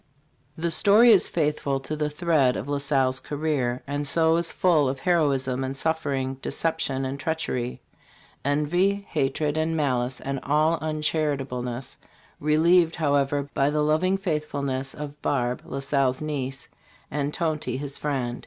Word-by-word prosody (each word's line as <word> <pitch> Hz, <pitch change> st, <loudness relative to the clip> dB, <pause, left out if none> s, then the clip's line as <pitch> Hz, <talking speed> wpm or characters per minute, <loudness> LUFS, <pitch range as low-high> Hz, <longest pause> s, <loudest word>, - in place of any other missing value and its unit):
The 170 Hz, +1 st, -1 dB
story 215 Hz, +8 st, +6 dB
is 200 Hz, -5 st, +5 dB
faithful 150 Hz, -4 st, -1 dB
to 155 Hz, -, -4 dB
the 150 Hz, 0 st, -1 dB
thread 150 Hz, -5 st, +2 dB
of -, -, -5 dB
La 145 Hz, 0 st, -1 dB
Salle's 135 Hz, -2 st, +1 dB
career, 145 Hz, -5 st, -2 dB
and 145 Hz, +1 st, -2 dB
so 160 Hz, +3 st, +3 dB
is 170 Hz, 0 st, 0 dB
full 155 Hz, -7 st, +3 dB
of 135 Hz, 0 st, -4 dB
heroism 135 Hz, -7 st, +1 dB
and 135 Hz, +1 st, -4 dB
suffering, 135 Hz, -4 st, -1 dB
deception 150 Hz, -5 st, -1 dB
and 135 Hz, +1 st, -4 dB
treachery, 130 Hz, -6 st, -2 dB, 0.6 s
"envy, 175 Hz, +8 st, +1 dB
hatred 150 Hz, +1 st, 0 dB
and 160 Hz, +1 st, 0 dB
malice 130 Hz, -3 st, 0 dB
and 135 Hz, 0 st, -3 dB
all 155 Hz, +4 st, +2 dB
uncharitableness, 140 Hz, -5 st, -2 dB, 0.2 s
" -, -, -29 dB
relieved, 165 Hz, +3 st, +3 dB
however, 145 Hz, -2 st, +1 dB
by 140 Hz, +1 st, +2 dB
the 150 Hz, 0 st, +1 dB
loving 165 Hz, +6 st, +2 dB
faithfulness 145 Hz, -7 st, -2 dB
of 150 Hz, 0 st, -8 dB
Barbe, 125 Hz, -3 st, 0 dB
La -, -, -6 dB
Salle's 135 Hz, -2 st, +1 dB
niece, 135 Hz, -3 st, -3 dB, 0.4 s
and 145 Hz, 0 st, -1 dB
Tonty, 155 Hz, -6 st, -2 dB
his 140 Hz, 0 st, -5 dB
friend. 130 Hz, -5 st, -2 dB
145 Hz, 145 wpm, -25 LUFS, 135-160 Hz, 0.6 s, story